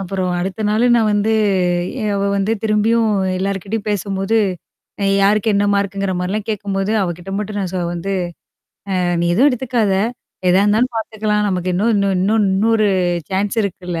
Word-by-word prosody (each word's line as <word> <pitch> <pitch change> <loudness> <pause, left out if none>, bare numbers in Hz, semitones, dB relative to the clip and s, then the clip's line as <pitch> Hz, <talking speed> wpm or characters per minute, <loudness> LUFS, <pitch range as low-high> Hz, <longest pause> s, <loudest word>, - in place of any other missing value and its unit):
அப்புறம் 190 -1 -2
அடுத்த 190 +4 -4
நாளு 220 +3 +2
நான் 225 -2 +2
வந்து 205 +2 +1 0.7
எ - - -2
அவ 200 - -1 0.2
வந்து 200 +2 0
திரும்பியும் 220 +1 +2 0.3
எல்லார்கிட்டயும் 200 +3 -3
பேசும்போது, 200 +1 -1 0.6
அ - - 0 0.2
யாருக்கு 210 +2 +3
என்ன 200 0 +2
மார்க்குங்கிற 200 -1 -1
மாரிலாம் 200 +4 -3
கேட்கும்போது, 200 -1 -2
அவகிட்ட 175 0 -4
மட்டும் 210 0 -4
நான் 190 -2 -3
ச - - -2 0.2
வந்து 175 +3 -3 0.9
அ - - +1 0.2
நீ - - +1
எதுவும் 260 +10 +5
எடுத்துக்காத. 245 -5 0 0.6
எதா 180 +2 +4
இருந்தாலும் 220 +5 +2
பாத்துக்கலாம். 215 -1 -1
நமக்கு 185 -1 -1
இன்னும் 215 +6 +2
இன்னும் 200 -1 +1
இன்னும் 210 +3 +2
இன்னும் 220 +4 +2
ஒரு 215 -1 +2 0.4
சான்ஸ் 195 +3 -1
இருக்குல்ல. 180 -3 -4
200 Hz, 160 wpm, -18 LUFS, 190-215 Hz, 0.9 s, எதுவும்